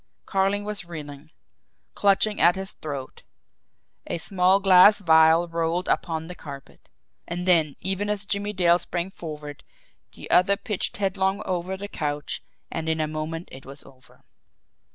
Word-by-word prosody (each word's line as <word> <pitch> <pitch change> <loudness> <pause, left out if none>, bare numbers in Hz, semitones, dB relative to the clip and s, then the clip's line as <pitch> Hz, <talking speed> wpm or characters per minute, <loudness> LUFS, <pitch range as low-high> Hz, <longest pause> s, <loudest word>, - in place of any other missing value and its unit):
Carling 195 +1 0
was 210 -2 -2
reeling, 150 -3 -9 0.6
clutching 205 +1 +2
at 175 +1 +6
his 190 0 -4
throat 140 -4 -7 0.9
a - - -2
small 185 +2 +2
glass 195 +1 +7
vial 160 -2 +5
rolled 170 +2 -1
upon 160 -2 -1
the 180 - -8
carpet. 140 -5 -12 0.4
And 175 +1 -4
then, 160 -5 +3
even 195 +2 -2
as 210 -1 -2
Jimmie 205 +1 -2
Dale 175 -2 +3
sprang 175 +2 -3
forward, 150 -5 -8 0.5
the - - -11
other 195 +2 +4
pitched 210 -1 -4
head 195 -1 -1
long 190 +2 0
over 185 +1 -3
the 200 +1 -6
couch 150 -5 -4 0.3
and 160 0 -3
in 160 0 0
a 155 - +1
moment 155 +2 -5
it 130 0 -10
was 140 +1 -10
over. 130 -1 -20
175 Hz, 155 wpm, -25 LUFS, 155-195 Hz, 0.9 s, glass